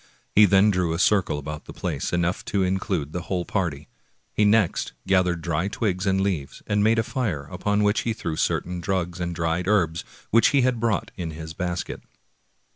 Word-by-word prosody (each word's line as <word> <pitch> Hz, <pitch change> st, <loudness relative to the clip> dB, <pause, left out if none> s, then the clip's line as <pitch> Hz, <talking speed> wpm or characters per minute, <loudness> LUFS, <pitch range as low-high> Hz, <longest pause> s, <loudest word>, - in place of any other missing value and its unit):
He 105 Hz, -, +7 dB
then 100 Hz, +1 st, +5 dB
drew 90 Hz, -3 st, 0 dB
a -, -, -1 dB
circle 95 Hz, -4 st, +2 dB
about 75 Hz, +1 st, -6 dB
the -, -, -9 dB
place, -, -, -3 dB
enough 85 Hz, +1 st, 0 dB
to 100 Hz, -2 st, 0 dB
include 95 Hz, -5 st, -1 dB
the 90 Hz, -, -2 dB
whole 90 Hz, 0 st, -2 dB
party. 80 Hz, -6 st, -2 dB, 0.5 s
He 105 Hz, -, +3 dB
next 105 Hz, -3 st, +2 dB
gathered 90 Hz, -3 st, +2 dB
dry 85 Hz, +1 st, 0 dB
twigs 100 Hz, -3 st, -1 dB
and 95 Hz, 0 st, +2 dB
leaves 90 Hz, -9 st, -2 dB
and 105 Hz, 0 st, +1 dB
made 110 Hz, +1 st, +4 dB
a 115 Hz, -, +3 dB
fire, 115 Hz, -, -2 dB
upon 105 Hz, +3 st, 0 dB
which 105 Hz, +1 st, +3 dB
he 115 Hz, -, -1 dB
threw 85 Hz, -7 st, -4 dB
certain 90 Hz, +2 st, -1 dB
drugs 90 Hz, -1 st, -2 dB
and 85 Hz, -1 st, -3 dB
dried 85 Hz, +2 st, -1 dB
herbs 85 Hz, -6 st, +2 dB, 0.3 s
which 115 Hz, +1 st, +6 dB
he 140 Hz, -2 st, +3 dB
had 125 Hz, -2 st, +1 dB
brought 110 Hz, -4 st, 0 dB
in 85 Hz, -3 st, -3 dB
his 80 Hz, 0 st, -7 dB
basket. 90 Hz, +1 st, -4 dB
90 Hz, 195 wpm, -24 LUFS, 85-105 Hz, 0.5 s, He